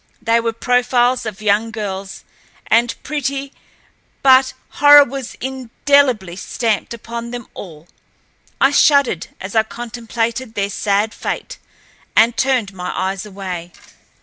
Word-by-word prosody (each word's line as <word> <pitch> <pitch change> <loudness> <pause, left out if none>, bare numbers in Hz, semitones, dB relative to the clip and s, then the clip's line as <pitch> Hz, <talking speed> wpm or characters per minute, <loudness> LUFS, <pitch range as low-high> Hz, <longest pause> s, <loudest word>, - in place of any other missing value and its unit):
They 230 +1 +2
were 230 0 -1
profiles 245 +1 +1
of 215 0 -7
young 210 +2 +2
girls, 195 -3 -6 0.4
and 235 +1 +2
pretty, 275 -2 -3 0.7
but 260 -1 +5 0.2
horror 290 0 +7
was 270 -1 -7
indelibly 260 -5 +1
stamped 225 0 -2
upon 235 0 -6
them 240 -1 -6
all. 165 -3 -11 0.7
I 270 - +4
shuddered 280 - +3
as 190 +1 -7
I 220 - +6
contemplated 230 +1 -4
their 200 0 -1
sad 205 +2 0
fate, - - -5 0.6
and 230 +1 +4
turned 250 -7 0
my 180 -1 -5
eyes 190 +2 -2
away. 185 -4 -7
230 Hz, 120 wpm, -18 LUFS, 200-260 Hz, 0.7 s, horror